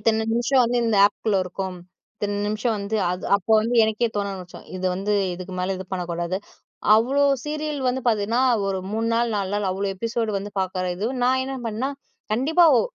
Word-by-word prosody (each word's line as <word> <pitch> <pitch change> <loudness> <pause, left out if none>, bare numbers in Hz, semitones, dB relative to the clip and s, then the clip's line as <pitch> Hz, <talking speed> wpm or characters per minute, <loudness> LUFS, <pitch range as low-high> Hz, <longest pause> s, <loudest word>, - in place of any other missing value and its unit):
இத்தன 220 0 +1
நிமிஷம் 245 +2 +3
வந்து 240 +1 +1
இந்த 225 -2 +2
ஆப்க்குள்ள 210 0 -1
இருக்கும். 185 0 -5 0.4
இத்தன 205 -1 -2
நிம்ஷம் 215 +2 0
வந்து 200 +2 -2
அது 180 +1 -4
அப்ப 200 +2 -13
வந்து 230 +3 -1
எனக்கே 220 +2 +1
தோண 200 -1 0
ஆரம்பிச்ரும், 180 -2 -11
இது 185 0 -2
வந்து 200 +3 -1 0.2
இதுக்கு 185 +1 -8
மேல 190 +1 -1
இது 190 - -6
பண்ணக்கூடாது 175 -1 -2 0.6
அவ்ளோ 265 +6 +3 0.2
சீரியல் 300 -1 -3
வந்து 255 +1 0
பாத்தீங்கன்னா, 220 +2 +1 0.3
ஒரு 190 - -1
3 225 +1 -1
நாள் 235 0 +1
4 195 -2 -2
நாள் 205 -2 0
அவ்வளவு 195 +1 -2
எபிசோட் 230 +1 -1
வந்து 200 +1 -7
பாக்குற 185 -1 -2
இது, 205 +5 -2 0.2
நான் 260 +1 +3
என்ன 270 +1 -4
பண்ணேன்னா, 230 +5 -2 0.4
கண்டிப்பா 305 +10 +4
ஒ - - +4
215 Hz, 185 wpm, -23 LUFS, 190-235 Hz, 0.6 s, கண்டிப்பா